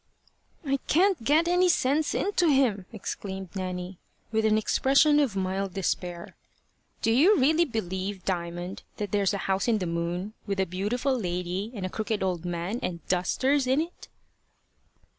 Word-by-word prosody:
"I 275 0 +1
can't 365 - +3
get 310 +7 +3
any 360 +1 +4
sense 295 -1 +2
into 380 -3 +1
him," 250 - +2
exclaimed 190 -3 -6
Nanny, 185 -1 -5 0.3
with 220 0 +1
an 215 0 +4
expression 275 +7 +4
of 265 -9 +1
mild 190 0 -2
despair. 175 -2 -3 0.7
"Do 225 - +3
you 325 - +5
really 315 +5 +4
believe, 190 - -4
Diamond, 175 0 -3 0.2
that 205 -2 -4
there's 200 -1 +2
a 200 - -4
house 195 +2 0
in 230 -2 +3
the 190 - -2
moon, 170 +4 -3
with 200 -1 -2
a 190 - +3
beautiful 210 +9 -1
lady 180 0 -3
and 195 -3 -4
a - - -2
crooked 215 0 -2
old 180 -2 -2
man 175 +6 -3
and 170 -3 -5
dusters 260 +10 +1
in 260 +3 +3
it?" 335 +3 -5
200 Hz, 160 wpm, -27 LUFS, 185-270 Hz, 0.7 s, you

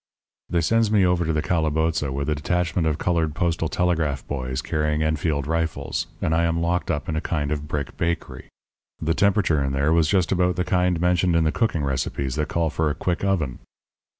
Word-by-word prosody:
"They 85 - +1
sends 115 +6 +2
me 105 -3 +4
over 90 -1 +2
to 80 - 0
the 75 -1 0
calaboza 80 -2 0
with 70 +1 -3
a 75 - +2
detachment 85 +3 0
of 75 -2 0
coloured 80 -3 0
postal 80 -1 0
telegraph 80 -7 0
boys 65 -2 -3
carrying 75 0 0
Enfield 80 -2 0
rifles, 80 -3 -2 0.2
and 80 - +1
I 85 +1 +2
am 85 0 0
locked 85 +1 0
up 75 - -2
in 80 - -2
a 80 - -1
kind 75 -3 -2
of 75 0 -3
brick 75 -1 -4
bakery. 85 0 -3 0.5
The 80 +1 0
temperature 100 -6 +2
in 70 0 -1
there 70 +4 +2
was 85 -2 +3
just 90 -1 +2
about 90 -1 +2
the 90 - -1
kind 90 -2 +1
mentioned 90 0 +2
in 85 - +3
the 80 - +2
cooking 95 -9 0
recipes 65 0 -2
that 75 0 -1
call 85 -2 0
for 80 0 0
a 75 - -2
quick 90 +4 -2
oven. 85 -10 0
80 Hz, 205 wpm, -23 LUFS, 75-90 Hz, 0.5 s, me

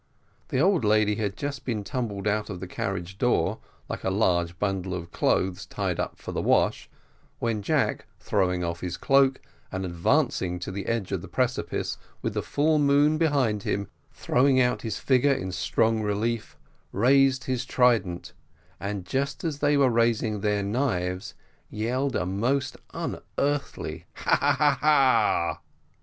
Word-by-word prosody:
The 130 - -1
old 180 - +3
lady 105 -1 +3
had 100 -2 -2
just 140 -1 -4
been 110 -5 -2
tumbled 105 -3 -3
out 105 +1 0
of 95 -3 -5
the 95 - -5
carriage 95 +1 -4
door, 125 -1 +1 0.3
like - - -5
a - - +1
large 90 -4 +1
bundle 95 -2 -2
of 85 -1 -7
clothes 95 -1 0
tied - - -2
up - - -3
for - - -7
the - - -2
wash, - - +1 0.5
when 115 -3 -1
Jack, - - 0
throwing 90 -3 0
off 85 0 -3
his 90 -1 -4
cloak, 135 -1 +3 0.3
and 95 0 -3
advancing 90 +1 +1
to 90 - -4
the 100 +1 -5
edge 115 -5 -1
of - - -1
the - - -9
precipice, - - -2 0.2
with - - -1
the - - -1
full 150 +1 +1
moon 145 +2 +4
behind 135 -10 +2
him 100 -1 -2 0.2
throwing 130 +1 +2
out 125 -1 +2
his 110 -3 -3
figure 135 +1 +3
in 95 -8 -3
strong 110 +4 +1
relief, 105 +2 -2 0.3
raised 130 +4 +3
his 130 -2 -2
trident, 115 -9 +1 0.5
and 100 -2 -4
just 140 +6 -2
as 155 -4 -2
they 145 0 +3
were 135 -3 +4
raising 115 -2 +1
their 105 -1 +1
knives, 95 -5 -1 0.3
yelled 125 +5 -1
a 90 - 0
most 120 +9 0 0.2
unearthly 145 0 -3
"ha! - - +2
ha! 145 0 +2
ha! 145 -2 +3
ha!" 140 -4 +3
110 Hz, 160 wpm, -26 LUFS, 95-135 Hz, 0.5 s, moon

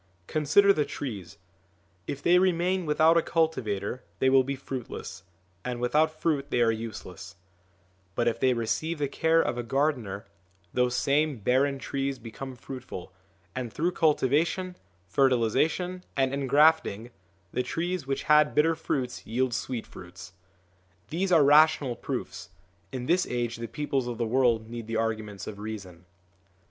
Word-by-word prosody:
Consider 180 - +4
the 150 - +1
trees: 105 -12 -6 0.7
if 140 - -5
they 180 +1 +5
remain 180 -1 +1
without 160 +2 +4
a - - +5
cultivator 125 - -1
they 130 +6 +3
will 135 0 +6
be 140 +2 -3
fruitless, 130 -2 -7 0.4
and 125 -1 -4
without 155 +6 +1
fruit 145 -4 0
they - - 0
are 115 -1 +4
useless; 95 -5 -7 0.8
but 120 - +1
if 115 - 0
they 130 -1 +3
receive 115 +9 -1
the 145 -1 0
care 160 +4 +2
of 120 0 -2
a - - -2
gardener, 125 -7 -1 0.5
these 125 -1 +1
same 145 +2 +1
barren 130 +6 +1
trees 135 0 -3
become 125 +3 -8
fruitful, 120 -8 -8 0.4
and 125 -3 -4
through 170 +8 0
cultivation, 165 +4 +1 0.3
fertilisation, 135 - +1
and 135 0 +2
engrafting, 140 -4 +3 0.4
the - - +1
trees 165 +3 -3
which 135 - -2
had 150 -1 +4
bitter 160 +2 +4
fruits 130 -6 -3
yield 125 +3 0
sweet 120 0 -3
fruits. 90 +2 -12 0.8
These 185 +4 -1
are 165 -4 +6
rational 145 -3 +5
proofs; 95 -11 -5 0.4
in 125 -2 -4
this 180 +5 +2
age 120 -1 -2
the 115 0 -5
peoples 135 -3 -2
of 120 -2 -4
the 120 - 0
world 115 -2 +2
need 115 -1 -7
the 115 - -3
arguments 110 -3 -3
of 100 -1 -7
reason. 100 -5 -8
130 Hz, 150 wpm, -27 LUFS, 115-155 Hz, 0.8 s, will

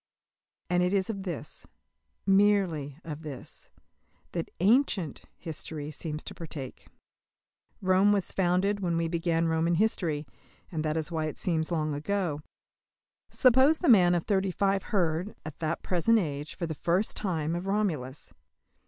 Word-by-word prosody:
And 180 0 +2
it 180 +2 +1
is 195 +2 +1
of 200 -3 -6
this 170 -6 -6 0.6
merely 195 -8 +3
of 155 -1 -6
this 145 -6 -9 0.6
that 170 -2 -3
"ancient" 195 - +2
history 155 -2 -6
seems 150 0 -5
to - - -7
partake. 150 -6 -8 1.0
Rome 190 +2 +4
was 200 -3 0
founded 190 +2 +1
when 175 -3 0
we 165 0 +1
began 165 0 0
Roman 165 +1 +2
history, 165 -6 0 0.5
and 160 -3 -2
that 155 0 0
is 160 +1 -2
why 160 -2 -1
it 155 - -4
seems 160 -2 -1
long 155 -3 0
ago. 155 0 -1 0.9
Suppose 260 +5 +5
the 345 - +1
man 180 -6 +6
of 170 - 0
thirty 195 -2 +1
five 195 +1 +1
heard, 180 -1 0
at 155 - -8
that 160 0 -2
present 190 +6 +3
age, 150 -6 -3
for 170 - -3
the 160 - -3
first 175 +7 0
time 165 -6 -1
of 175 +2 -4
Romulus. 160 -10 -2
170 Hz, 150 wpm, -29 LUFS, 155-195 Hz, 1.0 s, man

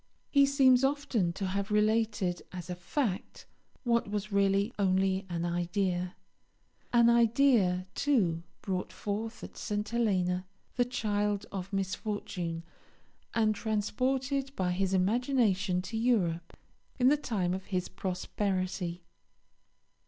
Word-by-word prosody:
He 280 -1 +6
seems 265 -2 +5
often 270 -10 +1
to 195 - -3
have 195 +2 -2
related 210 -3 +1
as 180 -1 -6
a - - -3
fact 190 +3 -3 0.4
what 235 -4 +1
was 210 0 -3
really 200 +3 +2
only 190 0 +2
an 170 -1 -2
idea, 175 +1 -1 0.8
an 235 -1 +5
idea, 235 -6 +4
too, 195 - +1 0.2
brought 185 -2 -2
forth 220 +3 -4
at - - -9
St. 210 -1 -3
Helena, 185 -6 0 0.3
the 245 - +3
child 210 -4 -1
of 195 0 -5
misfortune, 190 -4 -3 0.7
and 220 -2 +3
transported 260 +6 -1
by 180 -1 0
his 190 +1 0
imagination 200 -3 +2
to 225 - -6
Europe 180 -8 0 0.4
in 255 0 +5
the 295 - +5
time 200 -11 -1
of 190 0 -4
his 185 -2 -2
prosperity. 185 -1 -2
200 Hz, 120 wpm, -30 LUFS, 185-235 Hz, 0.8 s, He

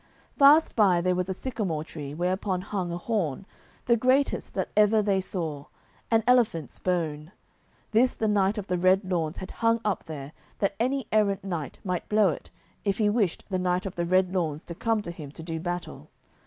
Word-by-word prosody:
Fast 290 +3 +6
by 195 -6 +4
there 180 +1 +1
was 180 +1 -1
a - - 0
sycamore 200 -11 -3
tree, 150 -3 -7
whereupon 185 +2 -1
hung 185 -2 -3
a 170 - -3
horn, 185 - -2 0.4
the 235 - +4
greatest 255 +4 +1
that - - -2
ever 210 +1 +5
they 200 -2 +2
saw, 165 -6 -4
of 140 - -15 0.4
an 225 -1 +3
elephant's 230 - +2
bone. 160 -3 -2 0.6
This 240 +4 +3
the 220 - -1
Knight 205 0 +2
of 205 - -3
the 180 -2 -1
Red 185 +3 +4
Lawns 170 -3 -2
had 190 - -7
hung 230 0 +1
up 210 -3 -1
there 145 -3 -7 0.3
that 200 -1 0
any 260 +2 0
errant 205 -3 +2
knight 170 -7 -4
might 180 -2 -3
blow 210 -2 +4
it, 155 - -6 0.3
if 200 -2 0
he 210 -2 +2
wished 205 -6 0
the 185 -2 -1
Knight 180 +1 0
of 190 - -4
the 170 - -1
Red 185 +1 +2
Lawns 160 -4 -1
to 170 - -7
come 225 +4 0
to 170 - -4
him 155 -5 -9
to 160 - -9
do 165 0 -4
battle. 175 - -5
185 Hz, 200 wpm, -27 LUFS, 170-215 Hz, 0.6 s, Fast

